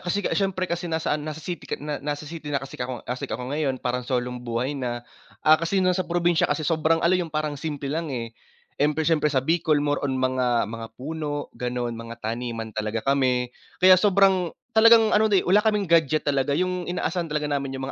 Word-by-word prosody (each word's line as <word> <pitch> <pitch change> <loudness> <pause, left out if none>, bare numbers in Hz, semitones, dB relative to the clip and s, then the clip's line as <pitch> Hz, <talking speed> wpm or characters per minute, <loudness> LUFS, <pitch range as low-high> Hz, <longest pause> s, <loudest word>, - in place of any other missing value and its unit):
kasi 190 +3 -2
kas - - 0
syempre 195 -2 0
kasi 175 0 -3
nasa 160 -1 -1
ano 150 +1 -3
nasa 155 0 -7
city 175 0 -6
ka - - -2
na 150 0 -5
na 145 +1 -2
nasa 145 - -9
city 155 0 -8
na 145 - 0
kasi 135 -1 -7
kako 125 -1 -4
kasi 125 +1 -4
ako 125 +3 -4
ngayon, 145 -3 0
parang 125 0 -2
solong 125 0 -2
buhay 120 +3 -2
na. 120 -4 -4 0.4
Ah, 155 +1 +6
kasi 170 +4 -1
noon 185 - +4
sa 185 +1 -2
probinsya 175 -1 +2
kasi 155 - -1
sobrang 165 +1 +1
ano 170 - +4
'yung 180 -2 +1
parang 155 -1 -2
simple 145 0 -5
lang, 165 +1 -2
eh, 115 -4 -4 0.5
empre 150 +2 +2
siyempre 155 -2 +2
sa 135 -3 0
Bicol 160 0 +2
more 145 0 0
on 135 -2 -1
mga 130 -2 +1
mga 115 0 -6
puno 145 +1 -4
ganon, 125 -1 -3
mga 115 0 -8
taniman 115 -1 -4
talaga 110 +1 -3
kami. 130 -3 +1 0.2
Kaya 185 0 +7
sobrang, 195 -3 +4 0.2
talagang 225 -1 +6
ano 220 +1 +4
eh, 200 -3 +3
wala 195 +4 +5
kaming 210 -2 +1
gadget 160 -3 +2
talaga, 140 0 +1
'yung 180 0 -1
inaasahan 175 -1 -2
talaga 150 0 -2
namin 140 -2 -2
'yung 130 - -4
150 Hz, 215 wpm, -24 LUFS, 130-170 Hz, 0.5 s, Kaya